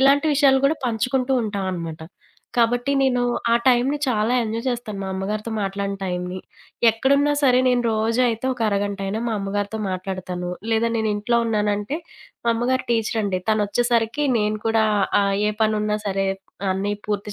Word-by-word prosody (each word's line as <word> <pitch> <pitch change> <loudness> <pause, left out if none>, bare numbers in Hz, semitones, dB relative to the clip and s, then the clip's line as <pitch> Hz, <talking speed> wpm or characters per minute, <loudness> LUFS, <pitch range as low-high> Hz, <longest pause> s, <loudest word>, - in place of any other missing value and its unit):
ఇలాంటి 280 +3 +4
విషయాలు 270 -2 +4
కూడా 310 +3 0
పంచుకుంటూ 250 +3 0
ఉంటాం 200 -3 -3
అనమాట. 165 -2 -5 0.6
కాబట్టి 245 +3 +2
నేను 255 -2 +2 0.3
ఆ - - +6
టైంని 255 +3 +3
చాలా 230 -1 +1
ఎంజాయ్ 225 +1 -3
చేస్తాను. 240 -5 -3
మా 190 - -4
అమ్మగారితో 210 +4 -3
మాట్లాడిన 200 0 -2
టైంని. 180 0 -3 0.5
ఎక్కడున్నా 280 +6 +2
సరే 255 -2 +5
నేను 245 -1 +2
రోజు 225 +3 +1
అయితే 230 +2 -1
ఒక 250 - -10
అరగంటయినా 200 +1 -2
మా 230 - -1
అమ్మగారితో 205 +2 -3
మాట్లాడతాను. 185 -1 -4 0.2
లేదా 225 +1 +2
నేనింట్లో 220 +2 +1
ఉన్నానంటే 210 +4 0 0.5
మా - - +5
అమ్మగారు 255 +3 0
టీచరండి. 215 -4 0
తనొచ్చేసరికి 230 +5 +1
నేను 215 0 0
కూడా 225 -1 +3 0.4
ఆహ్, 200 0 +1
ఏ - - +2
పనున్నా 210 -1 +1
సరే 195 0 0 0.5
అన్నీ 200 +2 -1 0.2
పూర్తి 205 0 -2
220 Hz, 145 wpm, -22 LUFS, 200-245 Hz, 0.6 s, ఆ